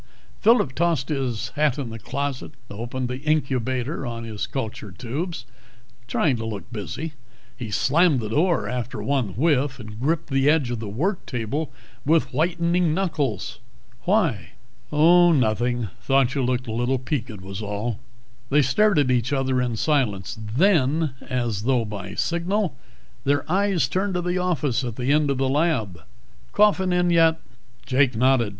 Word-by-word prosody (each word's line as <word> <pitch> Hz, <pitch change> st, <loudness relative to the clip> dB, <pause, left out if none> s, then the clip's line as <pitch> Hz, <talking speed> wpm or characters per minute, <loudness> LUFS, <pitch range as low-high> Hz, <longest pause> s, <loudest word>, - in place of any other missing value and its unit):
Phillip 220 Hz, -, +4 dB
tossed 160 Hz, -3 st, 0 dB
his 130 Hz, -7 st, -2 dB
hat 150 Hz, -2 st, +1 dB
in 130 Hz, -5 st, -4 dB
the 115 Hz, -, -7 dB
closet, 135 Hz, +4 st, -4 dB, 0.2 s
opened 120 Hz, +4 st, -4 dB
the 125 Hz, +1 st, -4 dB
incubator 135 Hz, -2 st, -1 dB
on 115 Hz, -2 st, -5 dB
his 110 Hz, -2 st, -4 dB
culture 110 Hz, -5 st, -5 dB
tubes, 135 Hz, -, -5 dB, 0.6 s
trying 130 Hz, +3 st, +1 dB
to 115 Hz, -, -5 dB
look 110 Hz, -3 st, -4 dB
busy. 145 Hz, +9 st, -5 dB, 0.4 s
He 120 Hz, -3 st, -6 dB
slammed 150 Hz, -, +3 dB
the 110 Hz, -2 st, -4 dB
door 155 Hz, -, +1 dB
after 125 Hz, +1 st, -4 dB
one 130 Hz, -9 st, 0 dB
whiff 140 Hz, 0 st, +2 dB
and 110 Hz, -2 st, -9 dB
gripped 155 Hz, +4 st, -1 dB
the 135 Hz, +1 st, +3 dB
edge 145 Hz, -6 st, +2 dB
of 120 Hz, -, -3 dB
the 110 Hz, -2 st, -5 dB
work 170 Hz, -, -1 dB
table 130 Hz, +6 st, -3 dB, 0.3 s
with 160 Hz, 0 st, +2 dB
whitening 170 Hz, +2 st, +1 dB
knuckles. 140 Hz, -, -2 dB, 0.5 s
"Why?" 175 Hz, -, +1 dB, 0.4 s
"Oh, 170 Hz, +3 st, +6 dB
nothing. 120 Hz, -3 st, +1 dB
Thought 135 Hz, -1 st, +2 dB
you 140 Hz, -, 0 dB
looked 125 Hz, 0 st, 0 dB
a 115 Hz, -, -5 dB
little 120 Hz, +4 st, 0 dB
peaked, 120 Hz, -5 st, -4 dB
was 95 Hz, +2 st, -7 dB
all." 105 Hz, +2 st, -3 dB, 0.5 s
They 145 Hz, +1 st, +4 dB
stared 200 Hz, -, +3 dB
at 140 Hz, -3 st, +3 dB
each 125 Hz, 0 st, +1 dB
other 130 Hz, -2 st, +1 dB
in 120 Hz, -2 st, -1 dB
silence. 110 Hz, -8 st, 0 dB, 0.2 s
Then, 160 Hz, -4 st, +3 dB, 0.2 s
as 120 Hz, -5 st, -1 dB
though 120 Hz, 0 st, +1 dB
by 100 Hz, -2 st, -6 dB
signal, 180 Hz, +3 st, 0 dB, 0.5 s
their 145 Hz, +1 st, +1 dB
eyes 190 Hz, -5 st, +2 dB
turned 190 Hz, +7 st, -1 dB
to 180 Hz, -, 0 dB
the 180 Hz, +1 st, 0 dB
office 150 Hz, -8 st, 0 dB
at 120 Hz, -3 st, -4 dB
the 125 Hz, +3 st, 0 dB
end 150 Hz, -1 st, +3 dB
of 140 Hz, -, 0 dB
the 135 Hz, 0 st, +1 dB
lab. 130 Hz, -, 0 dB, 0.5 s
"Coffin 205 Hz, -3 st, +4 dB
come -, -, +1 dB
in 175 Hz, -, +2 dB
yet?" 165 Hz, -1 st, +4 dB, 0.5 s
Jake 130 Hz, -2 st, +2 dB
nodded. 125 Hz, -1 st, +3 dB
135 Hz, 160 wpm, -24 LUFS, 120-160 Hz, 0.6 s, Oh